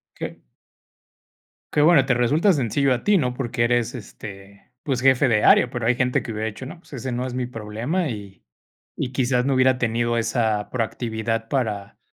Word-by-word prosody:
Qué - - -7 1.3
Qué 150 - +3
bueno, 150 -3 +6
te 135 - +2
resulta 145 - +3
sencillo 135 -1 +1
a 125 - -3
ti, 205 -1 +4
¿no? 125 -7 0
Porque 120 -2 -1
eres, 120 -1 +1
este, 100 -2 -11
pues, 130 -4 -1
jefe 135 +1 +4
de 110 -3 +2
área, 125 - +6
pero 120 -2 -4
hay 125 +2 +3
gente 125 0 0
que 120 - -6
hubiera 110 0 -3
dicho, 110 +4 -7
no, 165 +6 -9
pues 170 - -19
ese 130 -1 -4
no 125 +1 -2
es 125 - -6
mi 125 0 -2
problema. 120 - -3
Y 100 -5 -8 0.6
y 125 - -2
quizás 125 -1 +1
no 140 - +2
hubiera 130 0 +3
tenido 120 0 0
esa 115 -2 0
proactividad 115 -1 -2
para 105 -7 -2
120 Hz, 190 wpm, -23 LUFS, 115-130 Hz, 1.3 s, bueno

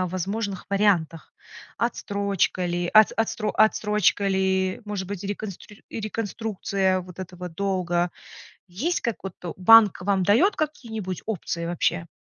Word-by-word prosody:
о 185 - +1
возможных 195 +2 -3
вариантах? 185 -6 +1 0.4
Отстрочка 200 -5 -1
ли 175 0 -2
от 215 +2 +6
от - - -15
отстро 215 -1 0
отсрочка 210 -2 +2
ли, 190 0 +1
может 205 -3 -4
быть, 200 -1 -6
реконстрир 205 0 -7
реконструкция 205 -3 -2
вот 180 0 -12
этого 180 -1 -7
долга? 175 -1 -1 0.6
Есть 265 - -2
как 235 -3 -2
вот 195 - -5
то 175 - -6
банк 210 0 +6
вам 195 0 +1
дает 235 - +4
какие-нибудь 220 - -4
опции 170 -5 -3
вообще? 170 0 -1
195 Hz, 135 wpm, -25 LUFS, 180-215 Hz, 0.6 s, от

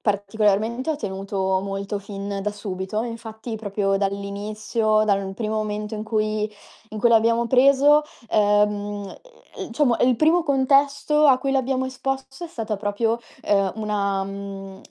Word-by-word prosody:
particolarmente 215 +5 0
ho 310 - -1
tenuto 190 -3 -2
molto 200 +1 -4
fin 200 0 -5
da 210 - -1
subito. 205 +1 -4
Infatti, 230 -1 -7
proprio 205 -2 -1 0.2
dall'inizio, 215 +2 -1
dal 195 -2 0
primo 215 +1 -3
momento 210 0 -3
in 210 - -4
cui 215 -1 -1 0.4
in 215 - -7
cui 235 - +4
l'abbiamo 230 +1 +3
preso, 275 +4 +5 0.3
ehm, 210 0 +4 0.9
mhmm, - - -5
diciamo 245 0 +2
il 250 -1 +4
primo 320 +6 +4
contesto 280 +1 +3
a 255 -1 +6
cui 270 +1 -1
l'abbiamo 260 -1 0
esposto 270 +2 -4
è - - -7
stata 225 -8 -4
proprio, 225 +3 -1 0.2
uhm, 195 -2 +2
una 200 -3 -1
mhmm, 195 -1 -8
215 Hz, 140 wpm, -23 LUFS, 200-250 Hz, 0.9 s, a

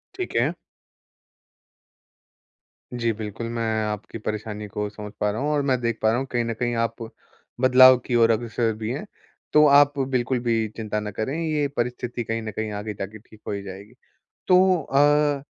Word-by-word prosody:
ठीक 370 -2 -5
है। - - +2 2.4
जी, 115 -1 0
बिल्कुल। 110 +1 -6
मैं 115 0 -3 0.2
आपकी 105 +1 -5
परेशानी 105 0 -5
को 105 +1 -4
समझ 105 0 -9
पा 105 - +1
रहा 110 - -4
हूँ, 150 - 0
और 145 -1 +1
मैं 130 -3 +1
देख 115 -1 -1
पा 110 - +3
रहा 115 - +2
हूँ 135 - -2
कहीं 120 -1 0
न 115 - -2
कहीं 120 +1 -2
आप 115 0 -1 0.7
बदलाव 130 0 +8
की 125 - -1
ओर 115 -1 +5
अग्रसर 115 0 0
भी 110 +1 -3
हैं। 145 +11 -4 0.5
तो 150 0 +7
आप 145 0 +5
बिल्कुल 130 -1 0
भी 115 -2 0
चिंता 105 -1 -2
ना 105 0 -5
करें, 110 +7 -3
ये 150 -2 0
परिस्थिति 120 0 -2
कहीं 115 0 -3
न 110 - -5
कहीं 110 +1 -4
आगे 105 +1 -5
जा 100 - -4
के 110 +2 -12
ठीक 110 0 -19
हो - - -2
ही 100 -1 -3
जाएगी। 100 +4 -10 0.6
तो 185 -2 +5
अ, 145 0 +3
115 Hz, 190 wpm, -24 LUFS, 110-130 Hz, 2.4 s, बदलाव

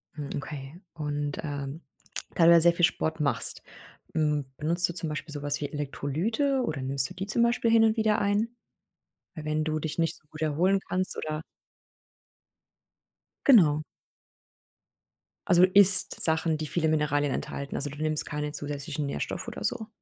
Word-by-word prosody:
Hm, 145 -2 -6
okay. 145 +2 -7
Und, 145 -2 -3
ähm, 145 0 -5 0.5
da 165 - +4
du 170 - +8
ja 170 -1 +7
sehr 170 +1 +6
viel 170 0 +4
Sport 160 -1 -2
machst, 145 -2 -1 0.5
hm, 150 -2 +1
benutzt 170 +3 +2
du - - -4
zum 165 -2 -2
Beispiel 150 0 -6
so 145 - -5
was 145 0 -2
wie 145 - -2
Elektrolyte 170 - -1
oder 150 - -3
nimmst 135 0 0
du - - -10
die 190 - -5
zum 235 +3 +2
Beispiel 235 -1 +2
hin 225 0 +6
und 220 0 +3
wieder 215 -1 +2
ein? 205 +3 +1 0.9
Weil 155 -3 -8
wenn 155 0 -1
du 155 0 -1
dich 155 +1 -5
nicht 165 -1 0
so 155 - -25
gut 155 +1 -9
erholen 175 +6 +2
kannst 185 +1 -1
oder 155 0 -4 2.0
Genau. 165 - +6 1.7
Also, 180 -2 +5
isst 195 +1 +5
Sachen, 160 0 +3
die 155 0 -4
viele 160 +1 0
Mineralien 145 -2 +1
enthalten, 140 0 -5
also, 145 - -1
du 145 - -10
nimmst 155 -1 0
keine 150 0 -4
zusätzlichen 145 0 -4
Nährstoffe 140 - -4
oder - - -6
so. 225 -3 -2
155 Hz, 170 wpm, -27 LUFS, 145-180 Hz, 2.0 s, du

